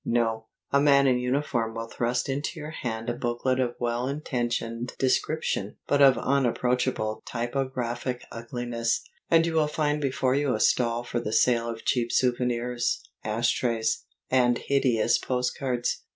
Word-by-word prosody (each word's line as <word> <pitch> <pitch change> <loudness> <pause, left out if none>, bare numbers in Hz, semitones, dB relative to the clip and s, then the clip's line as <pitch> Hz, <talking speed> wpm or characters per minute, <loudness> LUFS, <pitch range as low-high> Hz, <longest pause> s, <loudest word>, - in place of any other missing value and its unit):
No, 115 -2 0 0.2
a 140 - +4
man 140 -1 +5
in 125 -2 +3
uniform 125 -3 -1
will 115 0 -4
thrust 125 +3 -1
into 145 +4 -3
your 150 +1 -6
hand 115 -6 -4
a 120 - 0
booklet 120 +2 -1
of 120 -2 0
well 120 +1 -1
intentioned 120 -4 -2
description 130 -5 0
(but 145 0 +2
of 135 -2 +7
unapproachable 125 -4 0
typographic 125 0 -2
ugliness) 115 0 -2 0.3
and 165 -1 +5
you 165 - -1
will 155 -2 +3
find 150 0 0
before 130 -2 +1
you 140 -2 +1
a - - -3
stall 120 +1 +2
for 120 0 -2
the 110 - -4
sale 115 0 +3
of 115 -1 -7
cheap 120 -2 +1
souvenirs, 125 -1 0 0.2
ash 115 +3 +1
trays, 115 -2 0 0.3
and 125 -2 +4
hideous 125 -5 +2
postcards. 125 -1 -1
125 Hz, 150 wpm, -27 LUFS, 115-135 Hz, 0.3 s, of